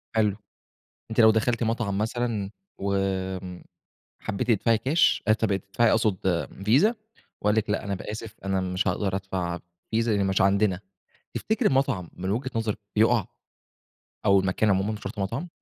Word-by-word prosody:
حلو، 105 Hz, -3 st, +3 dB, 0.8 s
أنتِ 110 Hz, -, -1 dB
لو 110 Hz, -1 st, +8 dB
دخلتِ 115 Hz, +2 st, +1 dB
مطعم 110 Hz, -3 st, -1 dB
مثلًا 110 Hz, -2 st, -1 dB, 0.3 s
وآمم، 95 Hz, -2 st, -2 dB, 0.6 s
حبيتِ 110 Hz, +3 st, -3 dB
تدفعي 115 Hz, +1 st, +3 dB
كاش 140 Hz, +8 st, +3 dB
آسف 110 Hz, 0 st, +3 dB
تدفعي 100 Hz, +4 st, +1 dB
أقصد 95 Hz, -6 st, +1 dB, 0.2 s
فيزا 145 Hz, -, +4 dB, 0.5 s
وقال 105 Hz, 0 st, +2 dB
لِك 110 Hz, -1 st, 0 dB
لأ، 105 Hz, -, 0 dB
أنا 100 Hz, -, -2 dB
ب 90 Hz, -, -7 dB
أسف 110 Hz, +1 st, -6 dB
أنا 95 Hz, -1 st, 0 dB
مش 90 Hz, +2 st, -1 dB
هأقدر 95 Hz, +1 st, 0 dB
أدفع 95 Hz, -3 st, -3 dB, 0.3 s
فيزا 115 Hz, -1 st, +1 dB
لإن 100 Hz, -1 st, +1 dB
مش 95 Hz, 0 st, +1 dB
عندنا. 100 Hz, -1 st, +3 dB, 0.5 s
تفتكري 220 Hz, +1 st, +1 dB
المطعم 130 Hz, -, 0 dB
من 95 Hz, +1 st, -4 dB
وجهة 125 Hz, +6 st, -1 dB
نظرِك 110 Hz, -2 st, -1 dB, 0.2 s
يقع؟ 110 Hz, -1 st, +4 dB, 1.0 s
أو 100 Hz, -1 st, +6 dB
المكان 95 Hz, +3 st, +1 dB
عمومًا 95 Hz, +3 st, +1 dB
مش 105 Hz, -, -6 dB
شرط 100 Hz, +2 st, -6 dB
مطعم؟ 115 Hz, -, -2 dB
105 Hz, 155 wpm, -26 LUFS, 95-115 Hz, 1.0 s, لو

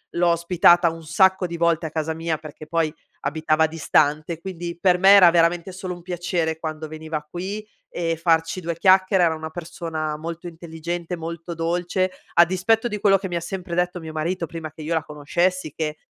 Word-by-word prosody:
L'ho 175 Hz, 0 st, +3 dB
ospitata 170 Hz, 0 st, +4 dB
un 165 Hz, 0 st, -8 dB
sacco 190 Hz, +3 st, +3 dB
di 170 Hz, -, -6 dB
volte 170 Hz, -1 st, +1 dB
a 155 Hz, -, -4 dB
casa 160 Hz, 0 st, -2 dB
mia, 165 Hz, 0 st, -2 dB
perché 155 Hz, 0 st, -11 dB
poi 160 Hz, -1 st, 0 dB, 0.3 s
abitava 155 Hz, +1 st, +1 dB
distante, 155 Hz, 0 st, +1 dB
quindi 175 Hz, -2 st, -6 dB
per 180 Hz, 0 st, +3 dB
me 190 Hz, +2 st, +5 dB
era 195 Hz, -3 st, +9 dB
veramente 170 Hz, +1 st, +2 dB
solo 185 Hz, 0 st, -5 dB
un 175 Hz, -, -11 dB
piacere 175 Hz, -2 st, -2 dB
quando 155 Hz, -1 st, -5 dB
veniva 155 Hz, -1 st, -5 dB
qui 195 Hz, +5 st, -5 dB, 0.2 s
e 165 Hz, -1 st, -2 dB
farci 165 Hz, +1 st, +1 dB
due 170 Hz, -1 st, -3 dB
chiacchiere. 185 Hz, 0 st, +4 dB
Era 165 Hz, -2 st, +2 dB
una 160 Hz, 0 st, -7 dB
persona 160 Hz, -2 st, -4 dB
molto 165 Hz, +2 st, -6 dB
intelligente, 170 Hz, +1 st, -5 dB
molto 170 Hz, +1 st, -6 dB
dolce, 175 Hz, +3 st, -1 dB, 0.2 s
a 170 Hz, -, +7 dB
dispetto 215 Hz, +7 st, +1 dB
di 210 Hz, -, -4 dB
quello 195 Hz, -1 st, +5 dB
che 190 Hz, 0 st, -6 dB
mi 175 Hz, -, -2 dB
ha -, -, 0 dB
sempre 180 Hz, 0 st, -6 dB
detto 180 Hz, +1 st, 0 dB
mio 160 Hz, -1 st, -7 dB
marito, 170 Hz, +3 st, -2 dB
prima 160 Hz, 0 st, -6 dB
che 160 Hz, -, -11 dB
io 155 Hz, +2 st, -2 dB
la 160 Hz, -, 0 dB
conoscessi, 165 Hz, +3 st, -1 dB
che 155 Hz, 0 st, -3 dB
170 Hz, 195 wpm, -23 LUFS, 160-180 Hz, 0.3 s, era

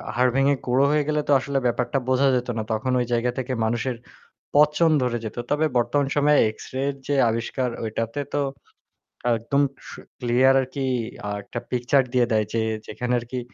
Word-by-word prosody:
হাড় 125 Hz, +1 st, +3 dB
ভেঙে 135 Hz, +1 st, +4 dB
গুড়ো 130 Hz, +2 st, +3 dB
হয়ে 150 Hz, 0 st, +2 dB
গেলে 150 Hz, 0 st, +1 dB
তো -, -, +1 dB
আসলে 140 Hz, +1 st, -2 dB
ব্যাপারটা 120 Hz, +2 st, 0 dB
বোঝা 130 Hz, +2 st, +3 dB
যেত 125 Hz, 0 st, -1 dB
না। 110 Hz, -, -1 dB
তখন 110 Hz, +4 st, -1 dB
ঐ -, -, +2 dB
জায়গা 120 Hz, +1 st, +1 dB
থেকে 130 Hz, 0 st, -2 dB
মানুষের 120 Hz, +3 st, -1 dB, 0.6 s
পচন 150 Hz, +3 st, +4 dB
ধরে 120 Hz, -1 st, 0 dB
যেত। 110 Hz, -, -6 dB
তবে 150 Hz, +2 st, +2 dB
বর্তমান 140 Hz, +4 st, +1 dB
সময়ে 145 Hz, 0 st, +4 dB
এক্সরে 130 Hz, +4 st, -8 dB
এর 140 Hz, -, -4 dB
যে 145 Hz, -, +1 dB
আবিষ্কার 120 Hz, +3 st, -2 dB
ঐটাতে 115 Hz, +3 st, -3 dB
তো 145 Hz, -, +1 dB, 1.0 s
একদম 130 Hz, +5 st, 0 dB, 0.3 s
স -, -, -8 dB, 0.3 s
ক্লিয়ার 125 Hz, +2 st, +3 dB
আরকি 135 Hz, +1 st, -3 dB, 0.4 s
আ -, -, -3 dB
একটা 120 Hz, -, -6 dB
পিকচার 125 Hz, +3 st, +2 dB
দিয়ে 125 Hz, -2 st, +3 dB
দেয় 110 Hz, -1 st, +2 dB
যে 115 Hz, -, +1 dB, 0.3 s
যেখানে 125 Hz, +3 st, -3 dB
আরকি 120 Hz, +2 st, -5 dB
125 Hz, 175 wpm, -24 LUFS, 120-140 Hz, 1.0 s, ভেঙে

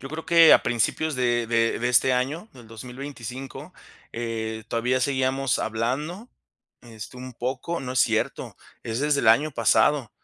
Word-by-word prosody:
Yo 135 Hz, -, -8 dB
creo 155 Hz, +3 st, -7 dB
que 165 Hz, -1 st, +7 dB
a -, -, +6 dB
principios 145 Hz, +6 st, 0 dB
de 120 Hz, -2 st, 0 dB
de 115 Hz, 0 st, +1 dB
de 120 Hz, -, -1 dB
este 125 Hz, +1 st, +3 dB
año, 145 Hz, -, -2 dB
del 120 Hz, -3 st, -15 dB
2025, 125 Hz, +2 st, -8 dB, 0.4 s
eh, 110 Hz, -1 st, -4 dB
todavía 125 Hz, +3 st, 0 dB
seguíamos 130 Hz, 0 st, 0 dB
hablando, 140 Hz, -, -3 dB, 0.5 s
este, 115 Hz, +1 st, -11 dB
un 130 Hz, 0 st, -9 dB
poco, 130 Hz, +8 st, -4 dB
no 125 Hz, -1 st, -5 dB
es 130 Hz, -, +2 dB
cierto -, -, -1 dB, 0.3 s
Es 115 Hz, +2 st, -4 dB
desde 150 Hz, -1 st, +1 dB
el 110 Hz, -, +2 dB
año 145 Hz, +8 st, +4 dB
pasado. 120 Hz, +1 st, +2 dB
125 Hz, 160 wpm, -24 LUFS, 115-140 Hz, 0.5 s, que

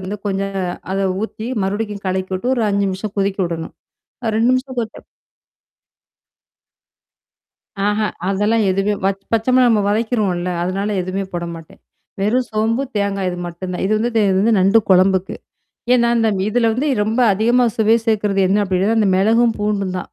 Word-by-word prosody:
வந்து 190 Hz, +2 st, -5 dB
கொஞ்சம் 195 Hz, 0 st, -2 dB, 0.3 s
அத 195 Hz, -, -1 dB, 0.2 s
ஊத்தி, 220 Hz, +1 st, -5 dB, 0.2 s
மறுபடிக்கும் 205 Hz, 0 st, -3 dB
கலக்கி 185 Hz, 0 st, -2 dB
விட்டு, 240 Hz, +8 st, -1 dB
ஒரு 235 Hz, -3 st, 0 dB
5 200 Hz, 0 st, +1 dB
நிமிஷம் 190 Hz, +2 st, -5 dB
கொதிக்கி 195 Hz, 0 st, 0 dB
விடணும். 165 Hz, -1 st, -6 dB, 0.5 s
அ 220 Hz, -, 0 dB
2 230 Hz, +3 st, +3 dB
நிமிஷம் 255 Hz, 0 st, -3 dB
கொதுச்சா 225 Hz, -1 st, -5 dB, 2.8 s
ஆஹா. 210 Hz, +1 st, +1 dB, 0.2 s
அதெல்லாம் 205 Hz, +3 st, +1 dB
எதுவுமே 195 Hz, +2 st, +1 dB
வச் 195 Hz, 0 st, 0 dB
பச்சமிளகா 250 Hz, +3 st, +3 dB
நம்ம 215 Hz, -2 st, +3 dB
வதைக்கிருவோம்ல. 205 Hz, -5 st, 0 dB
அதனால 195 Hz, +3 st, -2 dB
எதுவுமே 185 Hz, +2 st, -3 dB
போடமாட்டேன். 170 Hz, -2 st, -7 dB, 0.4 s
வெறும் 240 Hz, +6 st, +1 dB
சோம்பு, 225 Hz, +4 st, 0 dB
தேங்காய் 200 Hz, -2 st, -1 dB
இது 180 Hz, -, -5 dB
மட்டும் 175 Hz, +2 st, -6 dB
தான். 180 Hz, -, -3 dB
இது 200 Hz, -, -1 dB
வந்து 230 Hz, +3 st, 0 dB
இதே 225 Hz, -, +3 dB
இது 190 Hz, -, +2 dB
வந்து 225 Hz, +2 st, +3 dB
நண்டு 195 Hz, +4 st, +5 dB
குழம்புக்கு. 190 Hz, 0 st, +3 dB, 0.6 s
ஏன்னா, 235 Hz, -1 st, +3 dB
இந்தம் 220 Hz, -4 st, +1 dB
இதல 230 Hz, +1 st, +2 dB
வந்து 265 Hz, +7 st, -1 dB, 0.2 s
ரொம்ப 225 Hz, +4 st, -1 dB
அதிகமா 235 Hz, +5 st, +2 dB
சுவை 220 Hz, 0 st, +4 dB
சேர்க்கறது 210 Hz, -3 st, +1 dB
என்ன 200 Hz, -, +2 dB
அப்டின்னா, 185 Hz, 0 st, 0 dB
அது 225 Hz, 0 st, +2 dB
அந்த 205 Hz, -3 st, +3 dB
மிளகும், 225 Hz, +3 st, +3 dB
பூண்டும் 205 Hz, -1 st, -1 dB
தான். -, -, -2 dB
205 Hz, 160 wpm, -18 LUFS, 190-225 Hz, 2.8 s, நண்டு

